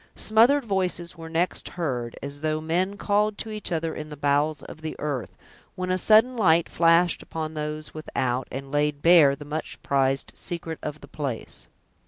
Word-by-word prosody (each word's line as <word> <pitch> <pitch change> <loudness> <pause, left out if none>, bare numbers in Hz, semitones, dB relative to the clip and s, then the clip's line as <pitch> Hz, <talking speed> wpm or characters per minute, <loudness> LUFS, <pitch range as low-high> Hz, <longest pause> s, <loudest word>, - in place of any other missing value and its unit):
Smothered 240 +6 +4
voices 180 -4 -1
were 165 -1 -9
next 170 +2 -1
heard, 125 -8 -2
as 140 +1 -5
though 155 0 0
men 180 +5 -1
called 205 +1 +1
to 220 - -5
each 215 -3 -5
other 165 -1 -1
in 155 0 -7
the 150 - -8
bowels 145 +2 +1
of 160 - -11
the 160 0 -5
earth, 135 -10 -4 0.4
when 185 0 -2
a 185 - +2
sudden 225 +6 +5
light 170 -7 +4
flashed 170 +1 +3
upon 160 -1 -5
those 150 0 -5
without, 130 -5 -2
and 135 +1 -6
laid 145 0 0
bare 165 -5 +7
the 145 - -10
much 155 +2 -5
prized 135 -1 +1
secret 170 -3 -4
of 150 0 -6
the - - -12
place. 135 -7 -5
160 Hz, 180 wpm, -25 LUFS, 145-180 Hz, 0.4 s, bare